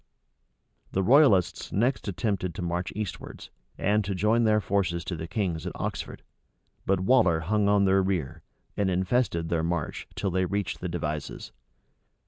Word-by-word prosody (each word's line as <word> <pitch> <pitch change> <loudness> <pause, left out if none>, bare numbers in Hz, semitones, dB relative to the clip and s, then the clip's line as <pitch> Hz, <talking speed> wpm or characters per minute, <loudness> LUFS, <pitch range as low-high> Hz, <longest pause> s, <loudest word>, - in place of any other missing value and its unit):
The 95 - +1
royalists 120 - +4
next 115 +2 0
attempted 95 -3 -2
to - - -4
march 85 +1 -2
eastwards, 105 -3 -6 0.3
and 105 +2 +2
to 100 0 -3
join 110 +5 +2
their 110 -1 +4
forces 95 -4 -1
to 90 - -3
the 80 0 -6
king's 90 -4 -2
at - - -4
Oxford: - - -5 0.6
but 95 -1 +2
Waller 95 -7 +4
hung 100 +4 +1
on 100 -1 +4
their 95 0 +4
rear, 90 -8 -2 0.3
and 100 -2 +1
infested 90 -2 0
their 85 -1 +1
march 85 -2 -3
till 100 - -1
they 95 +1 +1
reached 100 0 -2
the 90 - -4
Devizes. 75 -3 -4
95 Hz, 155 wpm, -27 LUFS, 85-105 Hz, 0.6 s, royalists